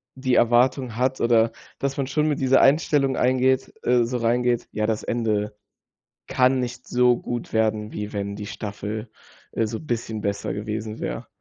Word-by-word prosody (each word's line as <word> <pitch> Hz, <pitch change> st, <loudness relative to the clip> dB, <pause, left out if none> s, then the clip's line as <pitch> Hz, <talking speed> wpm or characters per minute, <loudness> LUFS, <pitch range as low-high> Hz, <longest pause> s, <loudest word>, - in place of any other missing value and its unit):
die 130 Hz, -1 st, -1 dB
Erwartung 120 Hz, +1 st, +3 dB
hat, 130 Hz, +2 st, 0 dB
oder, 115 Hz, -1 st, +4 dB, 0.3 s
dass 140 Hz, 0 st, -2 dB
man 135 Hz, -, -1 dB
schon 150 Hz, +3 st, +1 dB
mit 150 Hz, -2 st, 0 dB
dieser 130 Hz, 0 st, +4 dB
Einstellung 140 Hz, -2 st, +3 dB
eingeht 130 Hz, +1 st, +2 dB
äh, 125 Hz, 0 st, +3 dB
so 120 Hz, +2 st, -2 dB
reingeht. 120 Hz, +1 st, +1 dB
Ja, 105 Hz, 0 st, -1 dB
das 110 Hz, -1 st, -1 dB
Ende 105 Hz, -3 st, -1 dB, 0.7 s
kann 130 Hz, +1 st, +3 dB
nicht 125 Hz, 0 st, -5 dB
so 125 Hz, 0 st, +3 dB
gut 120 Hz, 0 st, -5 dB
werden, 110 Hz, -1 st, 0 dB
wie 105 Hz, 0 st, -5 dB
wenn 100 Hz, 0 st, -3 dB
die 105 Hz, -, -6 dB
Staffel, 105 Hz, +1 st, -5 dB, 0.4 s
äh, 115 Hz, -, +1 dB
so 110 Hz, +1 st, -4 dB
bisschen 115 Hz, -6 st, -3 dB
besser 100 Hz, 0 st, -2 dB
gewesen 110 Hz, +1 st, -4 dB
wäre. -, -, -4 dB
120 Hz, 170 wpm, -24 LUFS, 110-130 Hz, 0.7 s, oder